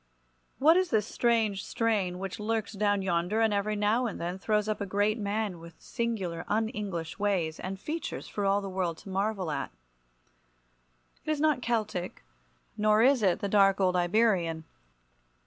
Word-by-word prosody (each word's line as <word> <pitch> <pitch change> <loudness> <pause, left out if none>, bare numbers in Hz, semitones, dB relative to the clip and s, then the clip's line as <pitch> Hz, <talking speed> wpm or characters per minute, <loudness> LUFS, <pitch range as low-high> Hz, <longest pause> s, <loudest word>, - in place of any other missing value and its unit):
What 320 +5 +5
is 370 -1 +1
this 215 -2 +2
strange 225 -4 +1
strain 205 -6 0
which 195 +2 -5
lurks 220 0 -2
down 205 -1 +1
yonder 180 +3 0
and 225 -2 +3
every 205 +1 0
now 215 +4 +1
and 215 - -6
then 175 +2 -4
throws 210 +1 0
up 215 -1 -2
a - - -1
great 205 +3 +1
man 205 -3 -2
with 165 0 -13
singular 195 -8 -3
un 220 +1 +1
English 190 -8 -5
ways 185 -6 0
and 190 +1 -5
features 320 - -5
for 205 - -4
all 200 +1 +2
the 200 - -5
world 185 -3 -2
to - - -9
marvel 195 -3 -1
at? 140 -2 -3 1.5
It - - -6
is 305 -1 0
not 300 -4 +2
Celtic, 215 -7 -2 0.5
nor 215 +1 +3
is 260 -1 +4
it 190 -4 +2
the 200 - -1
dark 195 -1 +4
old 185 -1 +2
Iberian. 175 -3 +2
205 Hz, 170 wpm, -29 LUFS, 185-220 Hz, 1.5 s, What